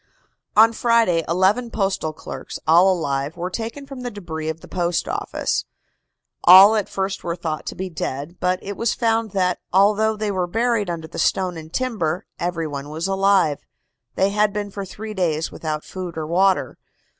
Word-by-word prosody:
On 225 +2 +7
Friday 230 -8 +2
eleven 190 +8 +2
postal 195 -6 -1
clerks, 155 - -8
all 175 +4 +6
alive, 145 -2 -2
were 180 +2 -4
taken 230 +7 -5
from 275 -2 -9
the 245 - -3
debris 160 -7 -5
of 160 +1 -5
the - - -12
Post 175 -2 -1
Office. - - -2 0.8
All 190 +4 +9
at 210 -3 -1
first 195 0 -3
were 170 -1 -2
thought 160 -3 -4
to - - -4
be 190 - -4
dead, 155 -1 -5
but 180 0 +1
it 200 +1 -5
was 230 +2 0
found 225 -1 +1
that, 180 -2 +1
although 210 +3 +3
they 210 -1 -1
were 185 -2 -1
buried 225 0 0
under 165 -2 -4
the 160 - -7
stone 185 -2 +1
and 160 -1 -9
timber, 205 -7 -1
every 170 -1 -2
one 145 -1 -5
was 160 +3 -4
alive. 195 -6 +2 0.6
They 195 +1 +2
had 210 0 +2
been 205 0 -4
for 200 -1 -5
three 215 +3 -7
days 165 -5 -1
without 155 -1 -4
food 180 -3 -7
or 155 - -2
water. 185 +4 +1
185 Hz, 180 wpm, -22 LUFS, 165-210 Hz, 0.8 s, All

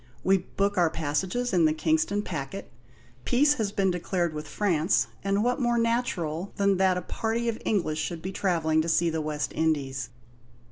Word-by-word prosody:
We 195 +1 +4
book 200 +2 -1
our 170 -2 +4
passages 180 +11 -2
in 170 -3 +4
the 155 - +3
Kingston 160 +6 +1
packet. 155 +1 -6 0.5
Peace 285 +4 +4
has 200 -2 -1
been 195 -2 +1
declared 175 -1 -1
with 150 0 -6
France, 180 -4 +1 0.2
and 200 +1 +1
what 245 +3 0
more 240 -1 +2
natural 200 -8 -1
than 200 -1 +2
that 185 -1 +3
a 180 - -3
party 230 +4 -2
of 230 -1 -2
English 170 -7 0
should 165 0 -4
be 190 - -3
travelling 165 -5 +1
to 165 - -2
see 165 +1 +2
the 160 0 -1
West 150 -1 -3
Indies? 135 -5 -1
180 Hz, 180 wpm, -27 LUFS, 155-205 Hz, 0.5 s, We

